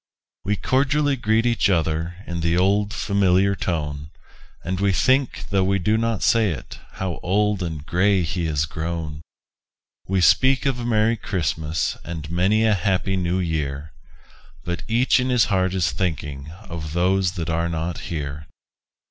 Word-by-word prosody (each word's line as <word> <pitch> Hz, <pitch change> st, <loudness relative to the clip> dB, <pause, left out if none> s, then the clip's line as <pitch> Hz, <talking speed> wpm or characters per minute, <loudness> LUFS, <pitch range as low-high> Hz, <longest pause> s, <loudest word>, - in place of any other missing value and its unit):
We 105 Hz, +1 st, 0 dB
cordially 140 Hz, +4 st, +1 dB
greet 110 Hz, -1 st, +1 dB
each 115 Hz, -3 st, +2 dB
other 80 Hz, -1 st, 0 dB
In 85 Hz, 0 st, -4 dB
the 85 Hz, +1 st, +1 dB
old, 100 Hz, +3 st, +2 dB
familiar 100 Hz, -1 st, +2 dB
tone; 75 Hz, -5 st, -3 dB, 0.5 s
And 95 Hz, +1 st, -3 dB
we 100 Hz, 0 st, +2 dB
think, 130 Hz, +7 st, +1 dB
though 95 Hz, -1 st, +3 dB
we 100 Hz, +1 st, +2 dB
do 105 Hz, +4 st, +1 dB
not 115 Hz, -1 st, 0 dB
say 115 Hz, -3 st, +3 dB
it, 75 Hz, -7 st, -7 dB
How 95 Hz, -3 st, -4 dB
old 105 Hz, +2 st, +1 dB
and 80 Hz, -4 st, -4 dB
gray 95 Hz, +2 st, +2 dB
he 85 Hz, +1 st, -2 dB
is 75 Hz, -1 st, 0 dB
grown! 80 Hz, -1 st, -5 dB, 0.9 s
We 95 Hz, 0 st, +1 dB
speak 130 Hz, +9 st, +4 dB
of 135 Hz, -3 st, 0 dB
a 120 Hz, -, -4 dB
Merry 115 Hz, 0 st, +2 dB
Christmas 80 Hz, -5 st, -2 dB
And 80 Hz, -2 st, -6 dB
many 100 Hz, +6 st, +2 dB
a 110 Hz, -, +4 dB
Happy 95 Hz, 0 st, 0 dB
New 90 Hz, -1 st, 0 dB
Year 80 Hz, -4 st, -3 dB, 0.7 s
But 90 Hz, 0 st, -3 dB
each 120 Hz, +4 st, +3 dB
in 125 Hz, +1 st, 0 dB
his 125 Hz, -3 st, +4 dB
heart 95 Hz, 0 st, +1 dB
is 90 Hz, -2 st, +1 dB
thinking 75 Hz, -5 st, -3 dB
Of 80 Hz, -5 st, -6 dB
those 90 Hz, +1 st, +2 dB
that 85 Hz, -3 st, -3 dB
are 85 Hz, +1 st, 0 dB
not 80 Hz, +1 st, -3 dB
here. 75 Hz, -2 st, -5 dB
90 Hz, 160 wpm, -22 LUFS, 80-105 Hz, 0.9 s, speak